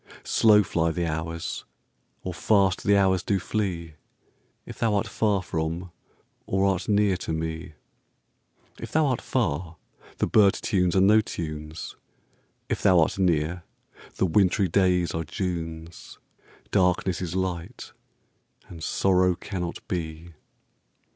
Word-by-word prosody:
Slow 105 -2 +5
fly 85 -3 0
the 85 +1 -1
hours, 80 +1 -4 0.6
or 90 - -4
fast 95 0 +2
the 100 0 +4
hours 95 -2 +3
do 100 0 0
flee, 90 -5 -3 0.7
If - - -10
thou 110 -2 +2
art 100 - 0
far 105 -4 0
from 85 +1 -3 0.6
or 95 0 +1
art 95 0 0
near 105 -2 +3
to 85 - -5
me:If 80 -1 -9
thou 155 0 +3
art 130 -4 0
far, 85 - -2 0.4
the - - +1
bird 100 -3 +4
tunes 90 -3 0
are 95 - +4
no 105 +3 +6
tunes; 75 -4 -6 0.7
If - - -2
thou 90 -2 +5
art 80 +4 +1
near, 85 -1 +1 0.5
the - - +1
wintry 95 +2 +3
days 90 -2 +2
are 80 - -2
Junes,—Darkness 85 +2 -3
is 90 -1 -4
light, 95 +4 -4 0.8
and 80 -3 -9
sorrow 90 0 +2
cannot 90 -2 -6
be. 85 -1 -5
90 Hz, 125 wpm, -26 LUFS, 80-100 Hz, 0.8 s, no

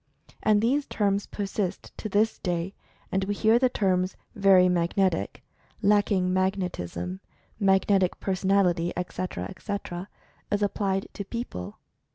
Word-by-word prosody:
And 215 -1 +3
these 275 +5 +2
terms 200 -1 0
persist 200 -2 -3
to 215 - -4
this 210 +3 +2
day, 175 +1 -2 0.4
and 195 0 +1
we 205 +1 -1
hear 220 +3 +4
the 255 0 +3
terms 185 -4 0 0.2
"very 195 -4 +6
magnetic"; 175 - 0 0.4
"lacking 200 -3 +3
magnet 185 -1 0
ism"; 90 +1 -5 0.4
"magnetic 195 -1 +3
personality," 185 -3 +1
etc., 180 - -3
etc., 180 - -5 0.4
as 205 0 +1
applied 195 -1 0
to 200 - -5
people. 195 - -6
195 Hz, 125 wpm, -27 LUFS, 180-205 Hz, 0.4 s, very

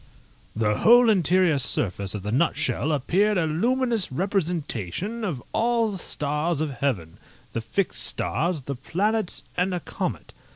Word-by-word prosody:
The 105 -1 +1
whole 240 0 +7
interior 180 -4 +3
surface 100 -5 0
of 100 - -5
the 105 - -3
nutshell 150 +3 +1
appeared 190 +9 +2
a 165 - +2
luminous 230 - +1
representation 180 - -2
of 155 - -3
all 230 -1 +2
the 195 - -5
stars 150 +1 -2
of 155 -2 -1
heaven, 115 - -2 0.3
the 115 - -2
fixed 175 - -1
stars, 165 -3 -1
the 140 - -4
planets, 195 - -1
and 180 +1 0
a - - -2
comet. - - -5
170 Hz, 140 wpm, -25 LUFS, 135-205 Hz, 0.3 s, whole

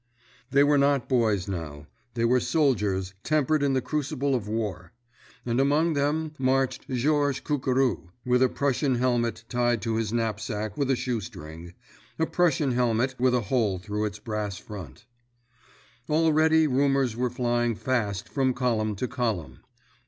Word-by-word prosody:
_" - - -46 0.5
They 140 +1 +4
were 145 0 +4
not 140 -2 +2
boys 110 -7 +1
now, 80 -6 -5 0.3
they 115 -1 +1
were 125 +2 +4
soldiers 105 - 0
tempered 155 0 +1
in 140 -1 +2
the 130 -2 0
crucible 145 -2 -1
of 115 -5 -1
war. 100 -6 -4 0.5
And 120 +2 +1
among 150 +4 +2
them 150 +2 0
marched 130 +1 0
Georges 140 +2 +1
Cucurou, 130 - 0 0.2
with 125 0 +2
a 130 - +5
Prussian 140 -1 0
helmet 120 -2 0
tied 120 -1 +1
to 115 -1 -1
his 110 -2 -1
knapsack 110 -2 -2
with 140 -2 -1
a 135 - +3
shoestring—a 85 - -6
Prussian 160 -6 +1
helmet 125 +1 +1
with 125 0 +3
a 125 - +2
hole 105 -3 0
through 105 +3 -3
its 105 -1 -4
brass 105 -3 -4
front! 95 -3 -10 1.0
Already 160 0 +4
rumors 135 -3 +2
were 125 +1 0
flying 120 -1 0
fast 110 -3 -1
from 130 -2 0
column 110 -4 0
to 125 +6 -2
column. 105 - -3
125 Hz, 150 wpm, -26 LUFS, 105-140 Hz, 1.0 s, a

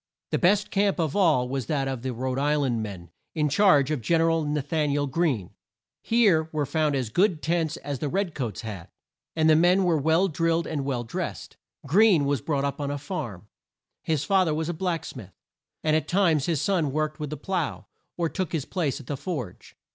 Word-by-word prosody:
The - - +1
best 200 +3 +2
camp 200 -1 +1
of 155 -4 -1
all 160 -11 +3
was 130 -3 -3
that 140 -3 0
of 130 -3 -3
the 130 +1 -3
Rhode 130 +2 -2
Is 145 +2 +2
land 125 -6 0
men 95 -6 -7 0.2
in 150 -2 +1
charge 150 -4 +4
of 150 -5 -1
Gen 165 +8 +2
er 165 0 +3
al 165 -1 +1
Na 150 0 -1
than 155 -1 0
i 140 - 0
el 145 0 +1
Greene. 135 - -1 0.5
Here 195 -9 +3
were 150 -2 -1
found 155 0 0
as 130 -5 -1
good 180 - +2
tents 165 -1 0
as 140 -2 -5
the 150 - -2
red 195 0 -1
coats 120 -8 -4
had, 105 -7 -7 0.5
and 160 -1 +3
the 155 - +6
men 180 +4 +4
were 170 -4 +2
well 160 +6 +3
drilled 165 0 0
and 145 -4 -3
well 130 -3 -2
dressed. 115 - -5 0.3
Greene 180 0 +4
was 140 -4 0
brought 140 0 -1
up 140 +1 -3
on 140 - -2
a 145 - -2
farm. 135 - -6 0.5
His 155 -3 -1
fa 195 +1 +3
ther 160 -4 0
was 160 +1 -2
a - - -1
black 170 -1 -2
smith, 100 -9 -10 0.5
and 155 0 +2
at 155 - 0
times 170 -6 +2
his 165 -5 0
son 170 -8 +1
worked 155 +2 -2
with 150 -2 -4
the 155 - -5
plough, 175 -1 -3 0.3
or 170 -1 +1
took 185 +1 -4
his 155 -5 -1
place 160 -8 -2
at 140 - -12
the 145 - -3
forge. 130 - -6
155 Hz, 225 wpm, -26 LUFS, 135-170 Hz, 0.5 s, the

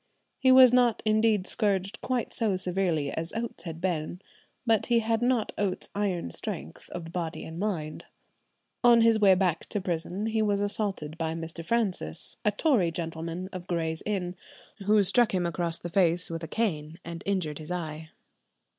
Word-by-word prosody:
He 260 - +5
was 255 -1 +8
not 245 -3 +3
indeed 215 -2 +3
scourged 200 0 0
quite 250 -3 -2
so 220 -5 +1
severely 180 -6 0
as 165 +1 -4
Oates 225 -7 -4
had 165 -1 -6
been; 175 -1 -2 0.5
but 225 -3 +2
he 240 - +3
had 225 0 +1
not 245 -2 +1
Oates's 195 -3 -2
iron 195 - -1
strength 80 -1 -7
of 165 -2 -7
body 170 -2 -4
and 160 +1 -7
mind." 170 -7 -3 0.8
On 240 -1 +7
his 225 -1 +5
way 195 -3 +6
back 180 -3 0
to 205 - -2
prison 180 +2 -3
he 220 0 0
was 205 -2 +1
assaulted 200 -6 0
by 160 0 -1
Mr. 165 0 -6
Francis, 190 - -1
a - - +4
Tory 210 - +2
gentleman 165 +2 -4
of 180 -1 -7
Gray's 160 -2 -1
Inn, 185 -4 -2 0.5
who 210 -1 +5
struck 215 +2 +3
him 180 -1 +1
across 170 0 -2
the - - -6
face 175 -1 +2
with 165 0 -4
a - - -4
cane 160 -8 -2
and 170 -1 -6
injured 175 -7 -1
his 155 - -9
eye. 160 -3 -5
185 Hz, 170 wpm, -28 LUFS, 165-215 Hz, 0.8 s, was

